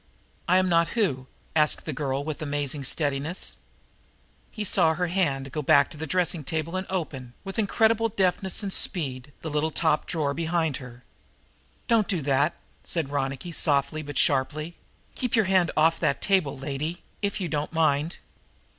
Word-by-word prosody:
"I 180 - +5
am 185 0 +3
not 170 -1 +4
who?" 135 - +1 0.3
asked 155 -1 +3
the 155 - -3
girl 135 0 -2
with 155 0 -5
amazing 145 -1 -1
steadiness. 145 +4 -1 0.9
But - - -28
he 215 - -2
saw 160 -5 +3
her 180 +2 0
hand 145 -7 0
go 150 - -2
back 140 0 +4
to - - -10
the 160 +1 -5
dressing 175 0 0
table 160 +4 -3
and 185 +1 -3
open, 135 -9 -4
with 195 +2 -5
incredible 225 +2 +3
deftness 190 -1 0
and 195 -1 -1
speed, 135 -7 0
the 160 - -3
little 150 +2 +1
top 155 0 +1
drawer 150 -4 0
behind 160 -2 0
her. 125 -1 -11 0.8
"Don't 225 -4 +3
do 180 -8 -1
that!" 140 +3 +2 0.3
said 160 -5 -2
Ronicky 140 +4 -2
softly, 145 0 +1
but 145 -2 -6
sharply. 150 +4 +1 0.4
"Keep 250 -2 -1
your 220 -3 +4
hand 185 -2 +3
off 160 +2 +4
that 145 -4 +1
table, 185 -9 +1
lady, 145 +5 -4 0.2
if 200 +1 -1
you 185 - -2
don't 150 -1 -2
mind." 160 0 +1
155 Hz, 170 wpm, -26 LUFS, 140-180 Hz, 0.9 s, I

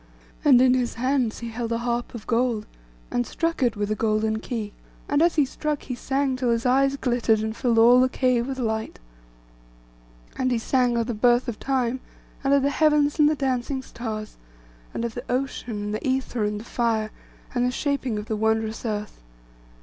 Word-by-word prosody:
And 270 -5 +7
in 255 -1 +5
his 250 -2 0
hands 255 -1 0
he 235 - -4
held 230 0 -4
a 230 - +1
harp 240 +1 -2
of 220 - -8
gold, 235 -2 0 0.5
and 120 - +1
struck 330 -2 -2
it 240 -3 +2
with 205 0 -1
a - - +1
golden 220 0 0
key; 220 -3 -5 0.3
and 290 +1 +2
as 340 +1 +3
he 295 -3 +4
struck, 300 +2 -3
he 255 - -5
sang 270 +2 -1
till 255 -1 -1
his 230 0 0
eyes 275 +2 +3
glittered, 240 -4 +1
and 220 0 -3
filled 240 -3 +1
all 240 +2 +7
the 255 - +3
cave 255 -2 +1
with 270 -1 -4
light. 220 -3 -2 1.4
And 260 -1 +2
he 245 - +1
sang 245 +1 +1
of 230 - +1
the 240 - -3
birth 240 +3 +3
of 235 -3 -4
Time, 260 -2 0 0.4
and 275 - +1
of 280 -1 +4
the 280 - +2
heavens 300 -1 +2
and 300 0 +6
the 310 - +1
dancing 265 -1 -1
stars; 220 -4 -6 0.5
and 235 - -3
of 230 - -4
the 245 +2 -6
ocean, 250 -2 -2
and 210 0 -3
the 215 - -3
ether, 260 -4 0
and 210 0 -2
the 220 - -10
fire, 225 -3 0 0.4
and 245 -2 +1
the 250 - +2
shaping 265 -3 -1
of 210 - -4
the 220 - -2
wondrous 220 0 0
earth. 210 - -4
245 Hz, 205 wpm, -24 LUFS, 225-265 Hz, 1.4 s, And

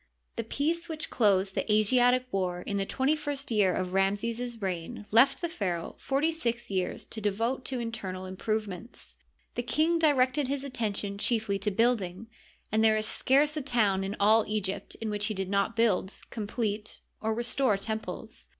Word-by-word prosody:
The 230 - -2
peace 320 +9 -1
which 315 -1 -3
closed 195 -4 +3
the 215 - -1
Asiatic 245 +4 +4
war 180 -2 -1
in 200 - -2
the 195 0 -1
twenty 270 +3 +1
first 290 -3 -4
year 205 -4 +4
of 185 0 -2
Ramses's 225 +5 0
reign 195 +3 -4
left 260 +5 +5
the 340 - 0
pharaoh 180 - -3
forty 285 +4 +1
six 240 -9 -3
years 185 -2 -2
to 220 - -7
devote 225 +6 0
to 260 - -2
internal 210 -6 -4
improvements. 215 +3 -4 0.4
The - - -1
king 310 +8 +2
di 315 -2 +5
rected 260 +1 +2
his 275 0 -2
attention 205 -6 -2
chiefly 215 -4 +1
to 210 - 0
building, 225 -2 0 0.4
and 220 +1 +3
there 220 -1 +5
is 215 - -2
scarce 285 +7 +2
a 305 - -1
town 215 -8 +2
in 195 +2 -3
all 215 +2 +5
Egypt 200 -2 -2
in 225 -1 -4
which 205 0 -1
he 215 - -2
did 190 0 -3
not 200 +3 +1
build, 215 -4 +2 0.2
complete, 215 -1 -3 0.2
or 220 0 0
restore 240 -1 +1
temples. 220 +2 -5
220 Hz, 175 wpm, -29 LUFS, 200-255 Hz, 0.4 s, left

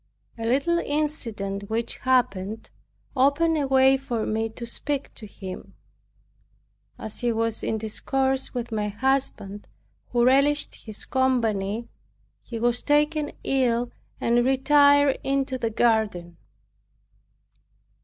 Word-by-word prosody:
A 225 -1 -4
little 285 +8 +2
incident 230 -11 -3
which 230 +1 -2
happened 220 -5 0 0.4
opened 285 +5 +3
a 290 -3 0
way 265 0 +5
for 240 -4 -3
me 225 +1 -1
to 235 +2 -8
speak 280 +4 -3
to 215 - -11
him. 190 -2 -9 1.2
As 220 -1 -6
he 240 -1 +1
was 225 0 -1
in 220 - -1
discourse 265 +5 -1
with 240 -2 -5
my 210 -1 -1
husband, 210 -3 -2 0.4
who 240 -1 +2
relished 280 +3 +4
his 215 -2 -9
company, 230 -5 0 0.5
he 235 - -7
was 240 +1 +1
taken 295 0 +1
ill 245 -3 +1 0.3
and 240 +1 +2
retired 285 +1 +4
into 270 -1 -1
the 230 -2 0
garden. 215 -7 0
240 Hz, 115 wpm, -25 LUFS, 220-270 Hz, 1.2 s, way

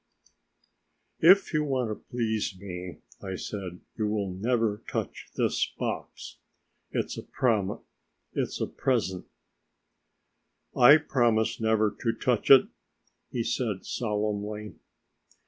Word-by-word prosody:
"If 185 +4 +6
you 155 0 +2
want 130 -6 -1
to 105 - -8
please 110 -5 -1
me," 90 -2 -7 0.2
I 95 -1 -4
said, 90 -2 -6
"you 110 -2 -1
will 105 -2 -1
never 110 +1 0
touch - - -4
this - - +1
box... - - -5 0.5
it's - - -3
a - - -5
present." 105 -6 0 3.0
"I 135 +5 +9
promise 120 -7 +1
never 110 -2 +2
to 115 - 0
touch 120 0 0
it," 135 -2 +9 0.6
he 120 - -2
said 115 -4 -2
solemnly. 105 -1 -3
110 Hz, 100 wpm, -28 LUFS, 105-120 Hz, 3.0 s, I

